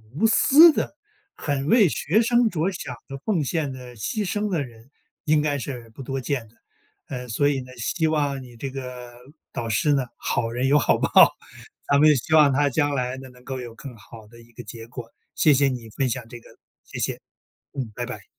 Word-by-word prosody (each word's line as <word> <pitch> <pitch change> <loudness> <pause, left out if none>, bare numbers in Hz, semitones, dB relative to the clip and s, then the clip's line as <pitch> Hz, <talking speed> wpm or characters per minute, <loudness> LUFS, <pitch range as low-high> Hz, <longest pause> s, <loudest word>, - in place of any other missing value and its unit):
无 195 - +1
私 305 +8 +7
的， 295 - -3 0.4
很 140 -1 -2
为 215 -1 +5
学 185 +9 +1
生 240 0 +3
着 170 +1 0
想 130 -8 -6
的、 135 - -7
奉 180 -9 +1
献 145 0 -2
的、 125 -2 -10
牺 205 - -3
牲 210 0 -1
的 165 -6 0
人 115 -1 -14 0.4
应 150 -1 +3
该 145 -1 0
是 125 -3 -6
不 - - -10
多 135 +1 -3
见 125 -3 -3
的， 115 - -26 0.5
呃， 125 -2 -6
所 145 +5 +1
以 135 -2 0
呢， 130 0 -12
希 160 +7 -1
望 145 -3 0
你 120 -1 -14
这 135 +3 -4
个 125 -2 -8 0.4
导 115 -1 -4
师 145 +7 +2
呢， 135 -2 +1
好 115 - -1
人 125 +3 -1
有 145 - +5
好 - - +2
报， - - -1 0.8
咱 140 0 +4
们 150 0 +6
希 140 +5 -2
望 150 -3 +7
她 145 +1 +2
将 145 +2 +1
来 125 0 -2
呢， 130 0 -10
能 125 0 -19
够 130 -1 -5
有 120 -2 -8
更 125 -1 -10
好 110 0 -14
的 115 +2 -16
一 115 - -20
个 120 - -9
结 115 +1 -10
果， 120 -1 -9 0.3
谢 155 - +5
谢 140 0 +3
你 120 -3 -6
分 130 +2 -1
享 120 +1 -4
这 120 - -9
个， - - -18 0.3
谢 - - -9
谢， - - -2 0.5
嗯， 125 -6 -4
拜 120 - -3
拜。 110 -6 -8
135 Hz, 230 characters per minute, -24 LUFS, 120-150 Hz, 0.8 s, 私